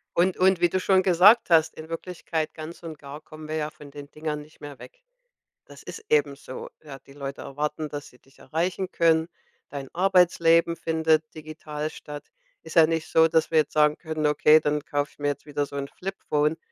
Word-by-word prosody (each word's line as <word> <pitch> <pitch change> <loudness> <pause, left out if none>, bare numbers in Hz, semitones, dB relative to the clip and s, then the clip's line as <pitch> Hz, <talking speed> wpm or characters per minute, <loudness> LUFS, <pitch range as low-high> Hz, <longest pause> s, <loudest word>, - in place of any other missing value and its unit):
Und 180 +2 +2
und 185 -1 +3
wie 175 - +4
du 185 - 0
schon 190 0 +3
gesagt 195 +6 +5
hast, 160 -1 +4
in 160 +1 -10
Wirklichkeit 165 -2 -4
ganz 160 +1 -9
und 165 -3 -8
gar 140 +2 -10
kommen 155 0 -12
wir 155 - -4
ja 150 -1 -2
von 145 -2 -14
den 145 0 -10
Dingern 155 -1 -5
nicht 150 +1 -18
mehr 145 -2 -9
weg. - - -14 0.6
Das - - -15
ist 440 - -9
eben 455 -1 +2
so, 475 +1 -9
ja? 140 -3 -10
Die 135 - -18
Leute 140 -1 -7
erwarten, 150 +2 -4
dass 145 0 -7
sie 125 - -21
dich 135 - -26
erreichen 180 +3 -3
können. 165 0 +2 0.4
Dein 140 -1 -7
Arbeitsleben 170 -2 +3
findet 160 -1 +1
digital 155 -1 -6
statt. 145 -1 -9 0.4
Ist - - -11
ja 165 -1 +8
nicht 160 0 -2
so, 160 0 +5
dass 160 0 +1
wir 160 - +3
jetzt 150 -2 +1
sagen 150 0 +3
können: 160 -2 -3
„Okay, 150 +1 +5
dann 150 0 -1
kauf 145 0 -2
ich - - -26
mir 145 0 -1
jetzt 145 - -3
wieder 145 -1 -2
so 140 - -13
'n 140 0 -4
Flip-phone, 160 -5 -2
155 Hz, 210 wpm, -25 LUFS, 150-170 Hz, 0.6 s, ja